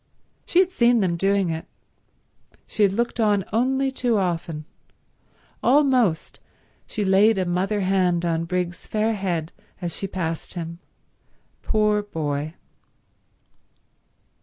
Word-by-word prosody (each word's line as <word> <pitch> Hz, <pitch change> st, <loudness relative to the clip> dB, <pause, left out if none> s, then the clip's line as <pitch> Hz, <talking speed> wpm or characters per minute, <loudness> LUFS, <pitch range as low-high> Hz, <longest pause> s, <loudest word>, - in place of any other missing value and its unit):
She -, -, -1 dB
had 370 Hz, 0 st, +5 dB
seen 240 Hz, -8 st, +3 dB
them 180 Hz, -3 st, +1 dB
doing 195 Hz, 0 st, +1 dB
it. 160 Hz, 0 st, -5 dB, 1.0 s
She -, -, -4 dB
had 200 Hz, -2 st, +5 dB
looked 235 Hz, +4 st, -2 dB
on 205 Hz, -4 st, +2 dB
only 265 Hz, +4 st, +1 dB
too 245 Hz, -4 st, 0 dB
often. 165 Hz, -5 st, -2 dB, 1.0 s
Almost 255 Hz, -, +2 dB, 0.5 s
she 210 Hz, -, -3 dB
laid 195 Hz, +3 st, +4 dB
a 185 Hz, -, 0 dB
mother 190 Hz, +4 st, 0 dB
hand 185 Hz, -2 st, +1 dB
on 165 Hz, -1 st, 0 dB
Briggs's 175 Hz, 0 st, -3 dB
fair 220 Hz, +1 st, 0 dB
head 175 Hz, -6 st, -2 dB, 0.3 s
as 175 Hz, -3 st, -4 dB
she 195 Hz, -, -3 dB
passed 165 Hz, -3 st, -4 dB
him. 170 Hz, -1 st, -6 dB, 0.8 s
Poor 210 Hz, -1 st, +2 dB
boy. 155 Hz, -5 st, -3 dB
195 Hz, 120 wpm, -23 LUFS, 170-220 Hz, 1.0 s, had